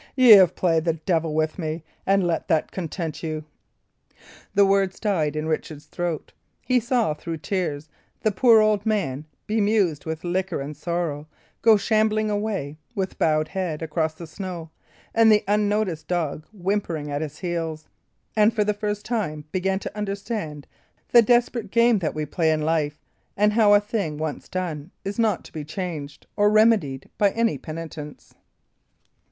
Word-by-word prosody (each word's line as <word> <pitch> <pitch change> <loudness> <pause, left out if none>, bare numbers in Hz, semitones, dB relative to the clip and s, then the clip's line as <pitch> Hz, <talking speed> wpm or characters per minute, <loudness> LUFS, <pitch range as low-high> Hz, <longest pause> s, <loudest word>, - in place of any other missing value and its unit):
Y' 255 -2 +5
have 195 -6 +9
played 165 -3 +2
the 165 -1 +1
devil 160 -1 -1
with 155 +3 0
me, 160 -1 -3 0.2
and 195 -1 +3
let 170 -2 -1
that 160 -5 +1
content 165 -3 -4
you." 155 -2 -4 1.1
The 200 0 +6
words 195 -1 +1
died 160 -8 0
in 155 0 -2
Richard's 155 -1 -3
throat. 175 -3 -4 0.3
He 255 -1 +3
saw, 235 -7 +1
through 165 +2 -6
tears, 155 -2 -3 0.3
the 215 - +2
poor 225 +2 +6
old 215 -1 +2
man, 175 -11 -1 0.2
bemused 205 -8 +1
with 160 0 -4
liquor 180 0 -1
and 145 +2 -5
sorrow, 155 -2 -3 0.3
go 225 -2 +6
shambling 215 0 +1
away, 205 -9 -2 0.2
with 190 -2 -3
bowed 155 -1 +2
head, 175 -5 -3
across 160 0 -1
the 170 - -8
snow, 170 -1 -7 0.4
and 225 -1 +6
the 210 -1 +4
unnoticed 205 -5 0
dog 160 -3 -2
whimpering 180 -7 -2
at 145 +1 -2
his 150 -1 -5
heels, 165 -3 -4 0.5
and 215 +1 +4
for 210 - +3
the 210 0 +1
first 205 0 -3
time 175 -11 -2
began 190 +1 0
to 200 - -7
understand 200 - -4 0.4
the 240 - +8
desperate 240 -1 +2
game 235 0 +4
that 160 -5 -2
we 155 0 -2
play 160 +2 0
in 155 -1 0
life; 155 -2 0 0.4
and 210 +1 +3
how 210 -2 +6
a - - +6
thing 205 -7 -3
once 155 -1 -4
done 170 -4 -4 0.2
is 200 +3 -4
not 220 -4 +1
to - - -15
be 155 - -5
changed 155 -3 -6
or 205 0 +4
remedied, 215 - +3
by 205 - +5
any 230 0 +1
penitence. 155 -2 -8
180 Hz, 165 wpm, -24 LUFS, 155-210 Hz, 1.1 s, have